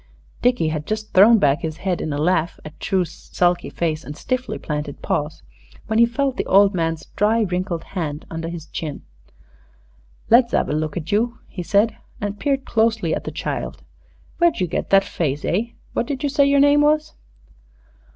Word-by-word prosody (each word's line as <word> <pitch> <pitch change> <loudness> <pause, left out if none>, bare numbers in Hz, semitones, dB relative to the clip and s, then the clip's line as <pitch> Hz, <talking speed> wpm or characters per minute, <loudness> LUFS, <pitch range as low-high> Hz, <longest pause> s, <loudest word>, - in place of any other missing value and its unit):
Dickie 245 -10 +2
had 155 -1 -4
just 215 0 -4
thrown 215 +5 +7
back 145 -5 +3
his 160 -1 -4
head 185 -2 -2
in 155 - -3
a 145 - -2
laugh 165 +2 +1
at 155 - -11
True's 185 -5 0 0.2
sulky 175 0 +1
face 160 -2 -2
and 150 - -8
stiffly 255 0 -2
planted 150 -2 -5
paws, 150 +1 -2 0.4
when 220 0 0
he 235 - +7
felt 265 +2 -1
the - - -1
old 200 +1 +5
man's 165 -2 -1
dry, 220 +3 +2
wrinkled 180 -3 -2
hand 155 -5 -5
under 165 0 -5
his 170 -2 -7
chin. 155 -3 -6 1.2
"Let's 235 +1 +5
'ave - - +1
a - - 0
look 155 +2 -2
at 170 -1 -5
you," 230 +3 +1
he 180 - -6
said, 205 +5 +2 0.2
and 205 0 -4
peered 275 -2 0
closely 220 -6 +1
at - - -3
the - - -4
child. - - -4 0.6
"Where'd 345 -2 +3
you 185 - +2
get 175 - -3
that 195 0 +6
face, 150 -7 -2
eh? 225 +7 -1 0.2
What 235 - -1
did 275 -1 -4
you 290 - +1
say 280 0 +3
your 280 0 +4
name 285 +1 +5
was?" 305 +1 +2
190 Hz, 190 wpm, -21 LUFS, 160-235 Hz, 1.2 s, thrown